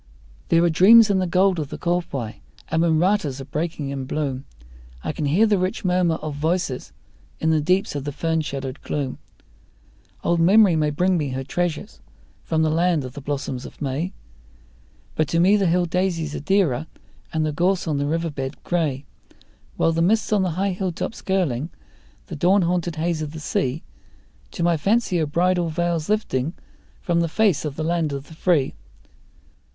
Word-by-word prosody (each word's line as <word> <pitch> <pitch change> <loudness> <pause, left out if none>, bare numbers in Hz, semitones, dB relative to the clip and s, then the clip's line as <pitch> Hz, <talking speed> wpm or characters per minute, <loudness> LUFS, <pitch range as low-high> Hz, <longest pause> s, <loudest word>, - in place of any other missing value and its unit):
There 165 0 +4
are 175 - +4
dreams 215 +6 +7
in 190 - +2
the 185 - 0
gold 185 +1 +3
of 145 -3 -4
the - - -6
kowhai, 170 -10 -2 0.3
and 160 - +1
when 165 -2 +3
ratas 170 -6 +1
are 135 - -6
breaking 155 -1 -3
in 135 -1 -4
bloom 135 -2 -3 0.6
I - - -2
can 150 0 -3
hear 170 +10 +4
the 210 -3 +2
rich 185 +1 -2
murmur 180 -2 +2
of 155 -2 -5
voices 155 -2 -2 0.5
in 160 - +1
the 155 -1 +2
deeps 180 +5 +1
of 145 -2 -4
the 145 - -3
fern 160 +2 -1
shadowed 135 -2 -5
gloom. 140 -3 -3 1.0
Old 170 0 +1
memory 190 +1 +6
may 155 -1 +2
bring 180 +4 +1
me 145 -3 -2
her 130 +1 -3
treasures 175 +3 -3 0.4
from 160 -1 0
the 155 - +2
land 165 -3 +1
of 125 - -8
the 145 - -8
blossoms 135 -2 -4
of - - -11
May, 150 +6 -2 1.0
But 155 - 0
to 165 - 0
me 190 +4 +5
the 200 -3 +2
hill 175 +1 +2
daisies 170 -3 -1
are - - -3
dearer 160 -5 +1 0.4
and 160 -1 0
the 155 - 0
gorse 180 +3 +1
on 150 -3 0
the 145 - -1
river 165 +1 -1
bed 135 0 -4
grey; 150 -6 -1 0.7
While 165 - +3
the 165 0 0
mists 215 +5 +2
on 205 - +3
the 180 -3 -1
high 195 +1 +1
hilltops 185 +3 -4
curling, 170 - 0 0.6
the 170 - -7
dawn 185 +5 +3
haunted 175 -1 -1
haze 160 0 -1
of 150 -1 -5
the 160 - -6
sea, 140 -1 -2 0.7
To 170 - -3
my 170 -1 +3
fancy 200 +1 +1
are 155 - 0
bridal 175 +2 +1
veils 170 0 -1
lifting 165 -8 0 0.5
from 170 -1 +1
the 170 - +1
face 200 -4 +2
of 145 -2 -4
the 155 - -3
land 165 -2 0
of 140 0 -6
the - - -11
free. 160 -4 +1
165 Hz, 190 wpm, -23 LUFS, 145-180 Hz, 1.0 s, dreams